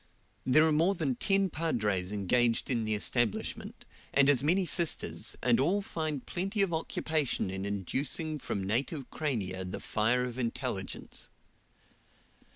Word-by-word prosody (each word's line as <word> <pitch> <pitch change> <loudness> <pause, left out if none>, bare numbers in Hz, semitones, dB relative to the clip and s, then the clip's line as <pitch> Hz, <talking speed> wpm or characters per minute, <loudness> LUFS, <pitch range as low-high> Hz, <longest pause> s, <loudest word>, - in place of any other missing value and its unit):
There 155 +5 +6
are - - +2
more 165 +6 +3
than 150 -7 0
ten 195 - +1
padres 105 - -1
engaged 115 +5 +1
in 115 -3 0
the 110 0 0
establishment, 115 +1 -1 0.3
and 140 0 +4
as 135 -4 +4
many 180 +6 +2
sisters, 170 0 +1
and 120 -2 +4
all 185 +9 +2
find 155 -7 -3
plenty 195 +3 -1
of 180 -4 -1
occupation 160 -8 -1
in 95 +1 -3
educing 135 - -2
from 100 -6 -3
native 130 - -2
crania 100 -11 -2
the 90 - -5
fire 115 +4 +1
of 125 0 -6
intelligence. 115 -2 -4
130 Hz, 140 wpm, -30 LUFS, 110-160 Hz, 0.3 s, There